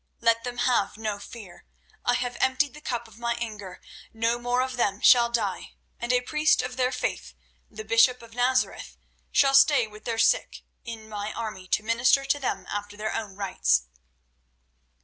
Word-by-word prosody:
Let 230 0 +2
them 245 -1 -5
have 245 -5 +1
no 215 -2 -3
fear; 200 -5 -12 0.4
I 245 - +2
have 245 0 -2
emptied 265 +2 +2
the 300 - -12
cup 235 -4 -4
of 220 +1 -17
my 235 0 -1
anger; 210 -5 -7 0.4
no 230 +2 0
more 245 +1 0
of 260 0 -4
them 205 -5 0
shall 240 -1 +6
die, 235 -1 -2 0.3
and 240 +1 -2
a 250 0 +3
priest 300 +1 +2
of 250 0 -5
their 255 0 +1
faith, - - -4 0.3
the 215 0 -9
bishop 230 +2 +4
of 230 0 -14
Nazareth, 250 +2 0 0.3
shall 275 -1 +4
stay 275 -2 +6
with 215 0 -14
their 230 -1 -2
sick 225 - +1 0.2
in 225 -2 -8
my 210 0 -5
army 210 -5 -6
to 210 - 0
minister 240 +5 +3
to 275 +1 +1
them 270 - -3
after 205 0 -5
their 215 +1 -3
own 205 -4 -5
rites." 185 - +1
235 Hz, 180 wpm, -26 LUFS, 215-250 Hz, 0.4 s, shall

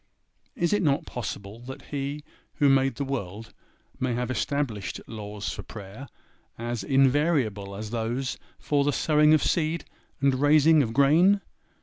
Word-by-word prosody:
Is 170 +3 0
it 205 - +2
not 140 -5 +1
possible 105 -2 -6
that 130 +2 -10
He 145 +1 -3 0.3
who 145 -3 +3
made 135 0 +3
the 140 - -3
world 115 -5 -5 0.5
may 125 -2 0
have 125 +1 -2
established 130 -5 -2
laws 105 -2 -6
for - - -6
prayer, 105 +5 -10 0.5
as 120 -2 -4
invariable 130 -6 +2
as 105 +1 -6
those 120 +3 -2 0.2
for 145 -1 +1
the 145 0 +1
sowing 150 +1 +3
of 155 - +1
seed 165 -1 0 0.3
and 140 -1 +3
raising 155 +1 +5
of 115 -5 -1
grain? 160 - +4
135 Hz, 145 wpm, -26 LUFS, 115-145 Hz, 0.5 s, raising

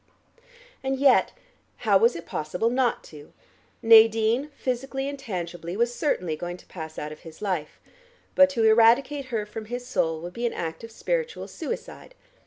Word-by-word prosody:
And 270 0 -1
yet 270 -1 +4 0.5
how 200 -3 +5
was 230 +4 +4
it 170 - -7
possible 180 +9 -2
not 250 -1 +1
to? 150 -1 -12 0.5
Nadine, 225 +4 +5
physically 270 +2 -3
and 280 0 -5
tangibly, 175 -5 -5
was 235 +1 +1
certainly 180 - -1
going 175 +2 -6
to - - -18
pass 160 -3 -9
out 150 - -5
of 155 - -10
his 160 -2 -13
life, 185 -7 -3 0.5
but 280 0 +6
to 240 -5 -1
eradicate 240 +6 +4
her 225 -5 -3
from 215 +1 -8
his 245 +2 -5
soul 160 -9 -1
would 175 +1 -7
be 240 +3 -1
an - - -4
act 165 +4 -5
of 230 - -8
spiritual 480 - -3
suicide. 480 +1 -7
225 Hz, 170 wpm, -25 LUFS, 175-260 Hz, 0.5 s, but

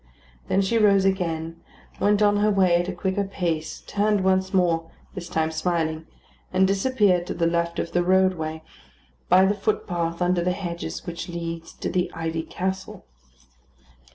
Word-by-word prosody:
Then 195 - +2
she 230 +4 +1
rose 200 -2 +4
again, 165 -4 -1 0.4
went 205 +1 +3
on 205 0 +4
her 210 +1 +3
way 190 -4 +3
at 175 +1 -1
a - - -2
quicker 190 +2 -1
pace, 170 -5 -3
turned 205 -1 +1
once 190 0 +2
more, 170 -3 +1 0.2
this 175 -3 -7
time 160 -2 0
smiling, 160 -1 -1 0.4
and 185 +1 +3
disappeared 195 -3 +2
to - - -4
the 170 - 0
left 170 0 0
of 170 - -3
the 175 - +2
roadway, 175 -4 +1 0.7
by 185 +2 +6
the 200 - +2
footpath 175 -5 -2
under 180 -1 +1
the 180 +1 +1
hedges 170 -4 -5
which 170 0 -6
leads 170 -1 -5
to - - -5
the 180 -1 0
Ivy 165 0 -2
Castle. 190 - -5
180 Hz, 160 wpm, -24 LUFS, 170-195 Hz, 0.7 s, by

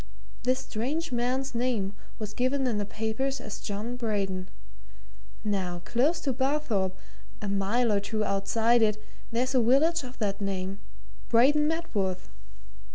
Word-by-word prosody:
This 255 +1 +2
strange 270 +7 -2
man's 255 +3 0
name 235 -5 0 0.2
was 210 -1 -5
given 260 +4 +1
in 230 -4 +1
the 205 - -2
papers 225 +6 -1
as 215 - -6
John 215 +4 -4
Braden. 195 -5 -1 0.9
Now 185 -4 -1
close 290 +8 +2
to 270 - 0
Barthorpe 240 -9 0 0.4
a 210 - -4
mile 200 +5 +2
or 205 - +3
two 215 +2 -1
outside 225 +4 +3
it, 215 -1 +3 0.3
there's 250 +3 +1
a 255 - +5
village 290 +8 +4
of 255 -1 -9
that 205 -2 -1
name 195 0 -2 0.5
Braden 285 +6 +5
Medworth. 200 - -1
230 Hz, 140 wpm, -28 LUFS, 200-260 Hz, 0.9 s, a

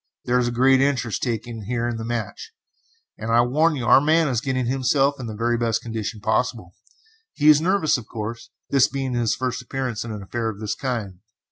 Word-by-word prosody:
There 125 +1 +2
is 120 - +1
a - - -1
great 130 +2 +4
interest 130 -5 0
taken 115 -2 -4
here 120 +1 -1
in 120 -1 -3
the 110 - -5
match, 115 - -5 0.7
and 115 - -3
I 120 +1 +5
warn 150 +7 +2
you 125 -4 -3
our 120 +3 +6
man 160 +2 +3
is 120 -3 0
getting 130 -2 -1
himself 135 +2 +1
in 125 - -5
the 110 - -6
very 120 +2 0
best 115 -1 0
condition 110 -2 -5
possible. 110 -4 -1 0.6
He 150 0 +3
is 150 0 +7
nervous, 170 -5 +2
of 115 - -12
course, 115 +1 -6 0.2
this 140 -1 +5
being 135 -2 -3
his 120 -2 +1
first 130 -1 -3
appearance 125 -3 -4
in 115 - -6
an 105 -2 -6
affair 115 +3 -3
of 105 -2 -7
this 110 -1 -2
kind. 110 -9 -4
120 Hz, 215 wpm, -23 LUFS, 115-135 Hz, 0.7 s, is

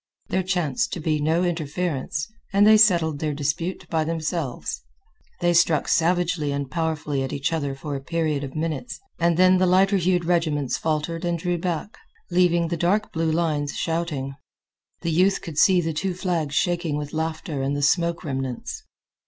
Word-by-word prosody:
There 190 - +1
chanced 185 +5 -1
to 180 - -3
be 155 -1 0
no 160 +4 +2
interference, 155 -3 -2 0.3
and 200 +1 +5
they 215 +1 +8
settled 170 -8 +4
their 150 -2 -2
dispute 155 +6 -2
by 160 -1 +2
themselves. 160 -3 -3 0.6
They 175 0 +3
struck 170 -3 +3
savagely 170 -3 +1
and 140 -2 -3
powerfully 155 -3 -1
at 135 - -3
each 145 +3 -1
other 145 -4 -2
for 140 +1 -5
a 135 - -4
period 155 -2 -1
of 135 -1 -7
minutes, 160 - -3 0.2
and 170 -1 +2
then 185 0 +5
the 185 - +3
lighter 195 +2 +4
hued 180 -1 +1
regiments 155 -6 +1
faltered 160 +2 -2
and 175 -1 0
drew 175 +1 -1
back, 175 +4 -3 0.3
leaving 175 -1 +3
the 170 - -1
dark 200 +6 +1
blue 160 -1 0
lines 155 -3 0
shouting. 160 -5 -2 0.7
The 170 - -1
youth 185 +4 +3
could 155 -3 -4
see 185 -2 +5
the 165 -1 -2
two 180 +4 -2
flags 170 -6 -2
shaking 175 -4 0
with 145 0 -5
laughter 160 -2 -3
amid 140 +2 -1
the 145 - -2
smoke 170 +3 +2
remnants. 135 -5 -4
165 Hz, 175 wpm, -24 LUFS, 150-175 Hz, 0.7 s, they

